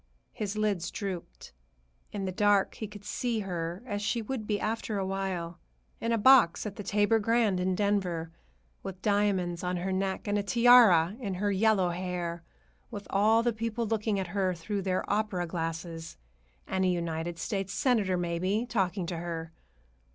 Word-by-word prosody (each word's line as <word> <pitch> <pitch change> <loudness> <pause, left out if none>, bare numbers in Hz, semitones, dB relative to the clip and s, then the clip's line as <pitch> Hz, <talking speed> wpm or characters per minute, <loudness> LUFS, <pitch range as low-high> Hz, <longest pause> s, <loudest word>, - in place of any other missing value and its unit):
His 210 0 -4
lids 205 -5 0
drooped. 190 - -6 0.6
In 200 -2 -3
the 185 - -2
dark 205 +1 +3
he 215 - -6
could 205 0 -12
see 230 0 -1
her 175 0 -4
as 205 -4 -3
she 225 +3 0
would 220 -1 -4
be 210 -1 0
after 220 -1 -2
a 195 - -1
while; 185 -3 -3 0.4
in 230 - -1
a 230 - +3
box 230 -6 +5
at 205 -2 -5
the - - -6
Tabor 205 +3 +2
Grand 220 -3 +2
in 185 0 0
Denver, 185 -5 0 0.5
with 190 -1 -8
diamonds 195 -4 +1
on 180 0 -1
her 185 +2 -2
neck 190 +1 -2
and 205 0 +1
a - - +1
tiara 215 -5 +6
in 200 -7 -3
her 205 +2 0
yellow 195 -2 +3
hair, 175 -1 -3 0.5
with 205 -3 -7
all 220 +3 +4
the 240 -1 +1
people 230 +1 -2
looking 215 -2 0
at 190 - -1
her 190 -1 0
through 195 +5 -3
their 185 -1 -1
opera 205 -4 0
glasses, 165 -1 -5 0.5
and 190 0 -1
a - - +3
United 170 -1 -2
States 195 +2 -3
Senator, 205 -7 +1
maybe, 180 +6 -1
talking 195 -5 0
to 170 0 -4
her. 165 -1 -5
195 Hz, 175 wpm, -29 LUFS, 180-215 Hz, 0.6 s, tiara